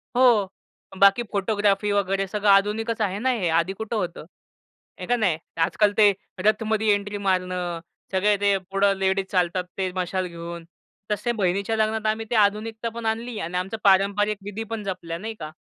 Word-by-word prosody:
हो, 240 -6 +4 0.5
बाकी 200 +4 +5
फोटोग्राफी 205 0 +1
वगैरे 195 -1 +1
सगळं 205 +2 0
आधुनिकच 210 +3 +2
आहे 200 -1 0
ना 260 +4 +1
हे? 220 -8 -1
आधी 165 +3 +1
कुठं 220 +3 -5
होतं? 180 -6 -3 0.7
आहे - - -5
का 245 - +3
नाही? 195 -9 +1 0.3
आजकाल 205 +4 +2
ते 210 -2 +7 0.3
रथमध्ये 220 0 +2
एंट्री 205 0 -3
मारणं, 180 -3 -1 0.3
सगळे 200 +2 +3
ते 200 -1 +3
पुढं 195 0 +3
लेडीज 190 0 +1
चालतात 180 -1 +1
ते 190 -1 -1
मशाल 185 0 -1
घेऊन, 170 0 -8 0.5
तसे 210 +4 0
बहिणीच्या 200 +4 0
लग्नात 220 0 0
आम्ही 225 +1 -5
ते 240 - -1
आधुनिकता 220 +3 -3
पण 230 0 -7
आणली 225 +1 -2
आणि 170 +2 -3
आमचं 190 +4 -3
पारंपरिक 200 +2 +3
विधी 205 +2 -5
पण 225 -2 -3
जपल्या, 180 -4 -4
नाही 220 +5 -5
का? 155 -1 -6
200 Hz, 170 wpm, -24 LUFS, 185-220 Hz, 0.7 s, ते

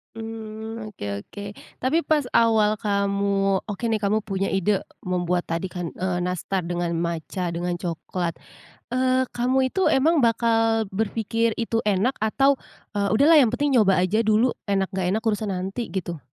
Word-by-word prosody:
Mmm, 220 -1 -7
oke 100 0 -5
oke. 205 0 -8 0.4
Tapi 280 +6 +3
pas 310 -3 +1
awal 215 -2 +3
kamu 200 -2 +1
oke 205 +3 -6
nih 225 -2 +1
kamu 210 +1 +1
punya 195 -2 -2
ide 195 +1 +1 0.2
membuat 180 -1 0
tadi 165 +3 -3
kan, 175 -3 -5
eee, 180 -1 -2
nastar 180 +1 -2
dengan 175 0 -2
matcha, 170 +1 -2
dengan 175 +1 -2
coklat. 175 0 -4 0.5
Eee, 255 +1 +2
kamu 260 +2 +1
itu 380 - +2
emang 310 +5 +3
bakal 225 -2 +2
berfikir 225 +2 0
itu 230 -1 -1
enak 205 +7 +1
atau, 270 +6 +2 0.3
eee, 200 -2 0
"Udahlah 305 +5 +6
yang 265 - +5
penting 280 -2 +2
nyoba 195 -3 +4
aja 195 +4 +1
dulu 225 +2 +3 0.2
enak, 195 -1 0
enggak 185 -2 -1
enak 225 - -2
urusan 215 -1 0
nanti," 195 +5 -3
gitu. 175 -4 -4
210 Hz, 160 wpm, -24 LUFS, 185-230 Hz, 0.5 s, Udahlah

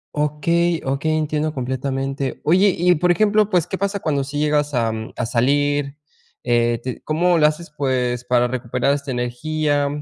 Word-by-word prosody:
Okey, 165 +3 +1
okey 140 +4 0
entiendo 155 0 -1
completamente. 135 +1 -3
Oye, 185 +4 +4
y 180 +1 +3
por 175 +3 +2
ejemplo, 210 +2 +3
pues, 180 -3 +2
¿qué 190 - -4
pasa 200 +1 -2
cuando 145 -5 -1
sí 145 +2 -4
llegas, 150 -1 +1
am, 110 -2 -2
a 125 - -2
salir? 140 +4 +1 0.5
Eh, 120 -1 +1
te 130 -1 -5
¿cómo 170 +3 +2
lo 150 - +4
haces? 155 +2 -1
Pues, 125 -3 -1
para 125 0 +2
recuperar 125 +1 -1
esta 140 -1 -5
energía, 145 +4 -1
145 Hz, 160 wpm, -20 LUFS, 125-160 Hz, 0.5 s, Oye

